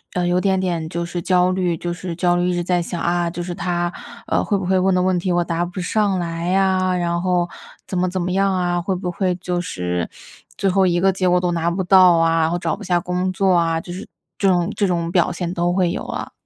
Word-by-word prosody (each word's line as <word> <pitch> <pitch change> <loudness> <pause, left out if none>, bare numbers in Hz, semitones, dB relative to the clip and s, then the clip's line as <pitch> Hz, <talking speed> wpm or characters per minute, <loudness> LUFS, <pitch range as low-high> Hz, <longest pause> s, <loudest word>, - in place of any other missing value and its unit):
呃， 180 - +1
有 180 +1 +2
点 190 -1 +2
点 170 -4 -2
就 170 +1 -3
是 170 0 -4
焦 180 0 +2
虑 180 -3 0
就 175 +1 -3
是 175 -1 -6
焦 175 0 +2
虑， 175 +1 +1
一 - - 0
直 175 - -1
在 180 0 +1
想， 170 0 -4
啊， 175 0 0
就 175 +1 -5
是 175 0 -5
他， 175 -1 -2 0.3
啊， - - +1
会 205 - 0
不 190 - -4
会 190 0 +2
问 190 0 +2
的 - - +2
问 185 -1 +1
题 180 +1 -1
我 175 0 +2
答 170 0 -1
不 180 +2 -5
上 200 +1 +1
来 170 +1 -2
啊？ 185 -1 +2
然 170 -1 -1
后 180 -1 +1 0.4
怎 185 - -6
么 180 0 +1
怎 185 +1 -3
么 180 +1 -2
样 195 +1 +2
啊， 175 -1 0
会 190 +1 -1
不 180 -1 -3
会 180 0 -1
就 180 -1 -3
是 90 - -3 0.5
最 195 - 0
后 190 0 +3
一 175 0 +1
个 195 +1 +3
结 185 -1 +1
果 180 0 +4
都 180 -1 0
拿 170 0 0
不 185 +2 -2
到 185 -1 +6
啊， 165 0 +3
然 160 - +2
后 175 - -1
找 - - -1
不 - - -11
下 175 -1 +1
工 180 +1 -2
作 190 0 +2
啊， 165 -2 +2
就 175 - -8
是 190 - -8 0.3
这 200 - +2
种 180 +1 +2
这 200 - +1
种 170 -1 -1
表 180 0 +2
现 175 0 -4
都 175 0 0
会 180 -2 +1
有 - - -4
啊。 - - -5
180 Hz, 285 characters per minute, -20 LUFS, 175-185 Hz, 0.5 s, 到